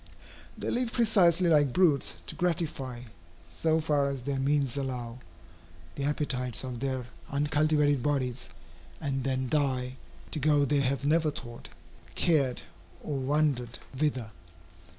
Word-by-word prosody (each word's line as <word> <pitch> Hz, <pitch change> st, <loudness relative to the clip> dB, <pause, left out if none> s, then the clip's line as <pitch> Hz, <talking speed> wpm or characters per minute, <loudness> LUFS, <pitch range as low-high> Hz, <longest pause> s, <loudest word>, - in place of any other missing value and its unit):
They -, -, -3 dB
live 245 Hz, -1 st, 0 dB
precisely 190 Hz, -7 st, +4 dB
like 145 Hz, -5 st, +4 dB
brutes, 160 Hz, -7 st, +2 dB
to -, -, -6 dB
gratify, 155 Hz, -8 st, -2 dB, 0.5 s
so 155 Hz, -, +1 dB
far 150 Hz, -3 st, +1 dB
as 135 Hz, -3 st, -5 dB
their 140 Hz, 0 st, -2 dB
means 140 Hz, -2 st, +1 dB
allow, 125 Hz, -3 st, -4 dB, 0.7 s
the 140 Hz, -, -3 dB
appetites 130 Hz, -5 st, -1 dB
of 125 Hz, -2 st, -5 dB
their 130 Hz, -1 st, -2 dB, 0.2 s
uncultivated 145 Hz, -1 st, +2 dB
bodies, 130 Hz, -, -1 dB, 0.5 s
and 135 Hz, -2 st, -2 dB
then 130 Hz, 0 st, -1 dB
die, 130 Hz, -2 st, 0 dB, 0.3 s
to 155 Hz, -, -2 dB
go 145 Hz, 0 st, +3 dB
they 145 Hz, +1 st, +2 dB
have 135 Hz, +1 st, 0 dB
never 155 Hz, +1 st, +3 dB
thought, 120 Hz, -5 st, -8 dB, 0.5 s
cared, 140 Hz, -7 st, +2 dB, 0.4 s
or 150 Hz, -, -3 dB
wondered 135 Hz, -3 st, 0 dB, 0.2 s
whither. 130 Hz, -6 st, -1 dB
140 Hz, 130 wpm, -29 LUFS, 130-150 Hz, 0.7 s, precisely